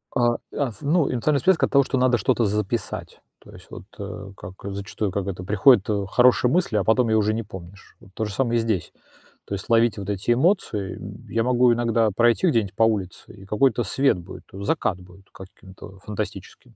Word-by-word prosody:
А, 120 -2 +2 0.2
аф 125 -6 -3
ну, 150 0 +1
эмоциональная 140 +4 +1
списки 185 0 +3
от - - -8
того, 140 -1 +5
что 130 - -2
надо 125 -1 +3
что-то 120 0 +1
записать, 105 +1 -3 0.2
то - - -17
есть - - -15
вот, - - -10 0.2
э, 95 0 -7
как, 90 0 -10
э, 100 - -4
зачастую, 100 0 -4
как 100 0 -3
это 90 -2 -5
приходит, 105 +2 +4
э, 100 -2 0
хорошая 125 +2 +4
мысль, 170 -10 +1
а 100 - +1
потом 115 +1 +2
её 110 - +3
уже 110 +1 +1
не 115 +1 -3
помнишь. 95 -1 -12
Вот - - -18
то 110 - -2
же 105 - -6
самое 120 -1 0
и - - +2
здесь. 110 -6 -2 0.5
То - - -7
есть 100 - -8
ловить 115 -1 +3
вот 100 0 -6
эти 100 +3 -1
эмоции. 120 - 0
М, - - -10
я 115 - 0
могу 125 0 +3
иногда 115 -1 +1
пройти 120 - +2
где-нибудь 110 - 0
по 115 - +2
улице, 105 -5 -2
и 95 - -14
какой-то 120 +4 +1
свет 135 +4 +1
будет, 90 +2 -11
э, 95 - -8
закат 100 - -1
будет 90 +2 -17
каким-то, 95 0 -13
а, - - -19
фантастическим. 100 - -7
110 Hz, 215 wpm, -23 LUFS, 100-125 Hz, 0.5 s, того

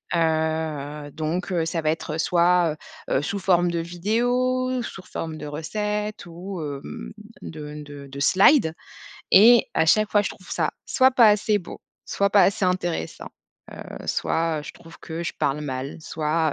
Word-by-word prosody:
heu, 155 -3 -1
donc, 160 +5 -3
heu, 165 -2 +1
ça 165 0 -2
va 155 - 0
être 160 0 -3
soit, 175 -2 +3 0.3
heu - - +1
heu, 135 - +2
sous 200 +6 -2
forme 175 -2 +2
de 170 - -1
vidéos, 245 +8 0
sous 190 -3 -8
forme 160 -1 -5
de - - -6
recettes 210 +7 -3
ou 175 +1 -7
hem, 135 - -7 0.3
de 150 - -8
de 145 -1 -10
de 140 +1 -9
slides 185 - +4 0.6
et 230 +4 +7
à 160 0 +2
chaque 215 +4 +3
fois, 205 - +4
je - - -2
trouve 185 - -12
ça - - 0 0.2
soit 260 0 +4
pas 235 -4 +6
assez 210 0 +2
beau, 175 - -10 0.2
soit 200 0 0
pas 200 0 +6
assez 200 -1 +2
intéressant, 175 - -2 0.6
heu, - - -9
soit 165 -2 0
je - - -7
trouve 165 0 -15
que 165 +1 -6
je - - -3
parle 145 +2 0
mal, 130 -1 -4
soit, 155 0 -1
170 Hz, 170 wpm, -24 LUFS, 155-200 Hz, 0.6 s, et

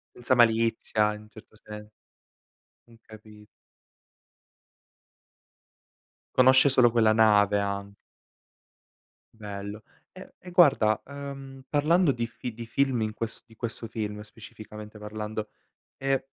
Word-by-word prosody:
Senza 125 +1 +1
malizia 115 -2 +2
in 105 - -11
un 105 - -17
certo 110 0 -16
se 105 0 -11 1.0
mh, 120 - -20
capi 105 -1 -15 2.9
Conosce 130 +2 +6
solo 125 -3 +5
quella 110 -2 +3
nave 105 -2 +4
a 100 0 -3 1.5
Bello. 105 0 -7 0.3
E - - -13
e 180 - -12
guarda, 140 -11 +4
ehm, 135 -1 -9
parlando 155 +1 +3
di 115 -1 -3
fi 120 0 -7
di 115 +1 -8
film 135 0 0
in 110 -1 -2
ques 115 0 -6
di 115 - -19
questo 115 0 -6
film, 105 -2 -5
specificamente 105 0 -12
parlando, 105 0 -5 0.5
ehm, 135 0 0
110 Hz, 115 wpm, -27 LUFS, 105-130 Hz, 2.9 s, Conosce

